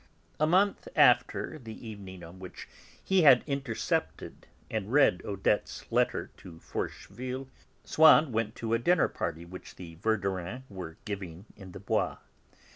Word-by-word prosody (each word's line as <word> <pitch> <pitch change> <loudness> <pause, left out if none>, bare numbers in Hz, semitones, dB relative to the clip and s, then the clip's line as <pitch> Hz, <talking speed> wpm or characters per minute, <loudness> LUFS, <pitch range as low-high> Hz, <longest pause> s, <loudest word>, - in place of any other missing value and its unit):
A 155 - +3
month 195 - +2
after 155 - +3
the 115 -2 -10
evening 95 -4 -9
on 85 +3 -11
which 95 -1 -10 0.4
he 190 -1 +3
had 135 -6 +7
intercepted 140 -5 -3 0.2
and 110 -1 -4
read 135 -10 +4
Odette's 100 +1 -2
letter - - 0
to 85 -3 -12
Forcheville, 130 +8 -5 0.4
Swann 155 -2 +6
went 115 0 -1
to 115 0 -3
a 115 - +3
dinner 175 +10 +3 0.4
which 90 +1 -11
the 85 -3 -10
Verdurins 95 +2 -2
were 90 -5 -8
giving 95 -3 -6
in 95 -3 -12
the - - -8
Bois. 100 - -1
110 Hz, 135 wpm, -29 LUFS, 95-130 Hz, 0.4 s, had